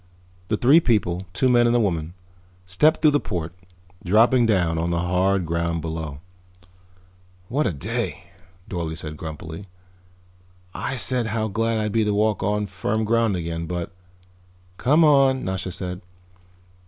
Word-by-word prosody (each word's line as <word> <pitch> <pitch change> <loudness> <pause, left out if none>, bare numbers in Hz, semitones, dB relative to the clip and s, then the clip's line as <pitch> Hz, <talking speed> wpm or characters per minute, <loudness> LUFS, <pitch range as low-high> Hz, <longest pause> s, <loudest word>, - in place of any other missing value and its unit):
The 110 - 0
three 135 +9 +6
people, 95 - 0
two 95 +8 +1
men 120 -1 +4
and 120 - +2
a - - +4
woman, 85 -5 -1 0.5
stepped 150 - +2
through 155 - +6
the 145 - +2
port, 85 - -4 0.5
dropping 115 +6 +4
down 85 -6 +1
on 85 +1 -1
the 85 - 0
hard 90 +2 +1
ground 85 0 -1
below. 80 -3 -5 1.3
"What 145 +5 0
a - - 0
day," 70 -5 -4 0.4
Dorle 85 -3 -4
said 75 -1 -7
grumpily. 80 +4 -8 1.1
"I - - -3
said 125 -1 +3
how 110 0 -2
glad 115 +3 0
I'd 105 -1 -1
be 110 +1 +2
to 105 -1 0
walk 105 0 +1
on 105 +1 0
firm 100 +3 -2
ground 115 -2 +2
again, 85 -1 -4
but 85 +1 -4 0.4
" 90 0 -32
"Come 150 +6 +4
on," 135 -3 +4
Nasha 95 0 -3
said. 90 +1 -5
95 Hz, 155 wpm, -23 LUFS, 85-115 Hz, 1.3 s, three